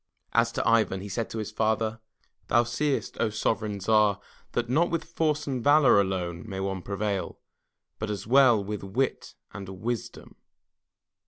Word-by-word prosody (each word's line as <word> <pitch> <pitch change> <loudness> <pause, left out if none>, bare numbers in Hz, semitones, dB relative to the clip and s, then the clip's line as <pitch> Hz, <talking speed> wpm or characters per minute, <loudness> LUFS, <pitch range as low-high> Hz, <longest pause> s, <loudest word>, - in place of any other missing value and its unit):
As 115 0 +3
to - - -1
Ivan, 110 -4 +3
he 100 - -7
said 110 +4 -3
to - - -6
his 110 -1 -4
father: 110 +1 0 0.5
"Thou 120 - +4
seest, 135 +5 -2
O - - +2
sovereign 110 -1 -1
Tsar, 105 0 +3 0.3
that, 120 0 -1
not 155 +8 +2
with 165 -1 -1
force 155 -2 -1
and 130 -4 -3
valor 145 -7 +6
alone, 90 -3 -3
may 95 -1 -4
one 95 -1 -2
prevail, 100 0 -3 0.6
but 110 - -3
as 100 -2 -4
well 120 -3 +5
with 105 +1 -5
wit 120 +7 -2 0.2
and 95 -1 -7
wisdom." 110 +5 -5
110 Hz, 160 wpm, -27 LUFS, 100-120 Hz, 0.6 s, valor